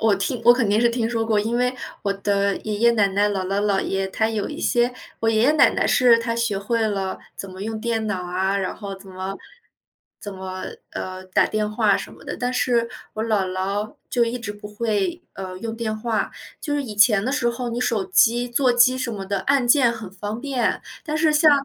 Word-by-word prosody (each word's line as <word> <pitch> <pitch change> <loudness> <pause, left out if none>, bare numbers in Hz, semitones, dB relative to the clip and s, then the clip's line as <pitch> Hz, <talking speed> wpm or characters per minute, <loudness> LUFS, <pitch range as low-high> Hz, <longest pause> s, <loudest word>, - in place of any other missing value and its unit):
我 220 -2 +4
听 210 +5 -2
我 240 - +10
肯 240 -4 +1
定 210 +2 +3
是 240 - +4
听 235 -1 -1
说 230 -1 -1
过， 215 -2 +2
因 230 +3 -1
为 250 +1 +1 0.3
我 200 - +1
的 200 0 0
爷 210 -1 -4
爷 235 +2 +4
奶 210 -4 +3
奶、 200 +2 +2
姥 195 -2 -2
姥 195 +2 0
姥 200 -2 +1
爷， 195 0 -1
他 220 +3 0
有 215 -2 -2
一 300 - -7
些 240 0 +2 0.3
我 225 - +1
爷 220 0 +2
爷 275 +5 +5
奶 305 -2 +6
奶 - - 0
是 240 -2 +5
他 230 0 -2
学 235 -4 0
会 230 +4 -1
了 195 -2 -2 0.2
怎 195 - -7
么 185 +1 -8
用 220 0 -3
电 225 -1 -1
脑 190 -4 -2
啊， 190 +2 0
然 190 -2 -2
后 200 -2 -6
怎 190 +1 -15
么 190 +1 -5 0.8
怎 205 - -7
么， 185 0 -6 0.3
呃， 185 0 -6
打 185 - +2
电 215 -1 -1
话 215 -2 +3
什 - - -7
么 - - -15
的， - - -4
但 250 0 -1
是 240 -2 +1 0.3
我 215 - -2
姥 210 -4 +1
姥 195 +3 -2 0.2
就 240 -2 +3
一 235 +2 -3
直 220 -4 -5
不 210 0 -10
会， 210 -4 -1
呃， 185 -1 -6
用 225 +3 -4
电 220 -2 -2
话。 220 0 -1 0.3
就 295 -3 -2
是 290 - 0
以 225 -6 -7
前 210 -1 +5
的 255 - 0
时 245 -4 +1
候 240 +1 -3
你 235 - -3
手 225 -5 0
机、 230 +6 +3
座 250 +1 +2
机 245 +2 +5
什 255 -2 -2
么 200 -2 -5
的 200 0 -1
按 275 -3 +2
键 245 -2 +5
很 220 -5 -8
方 205 +4 -5
便。 260 -4 -1 0.2
但 305 -1 -2
是 310 0 +3
像 305 +1 +6
220 Hz, 250 characters per minute, -23 LUFS, 200-240 Hz, 0.8 s, 我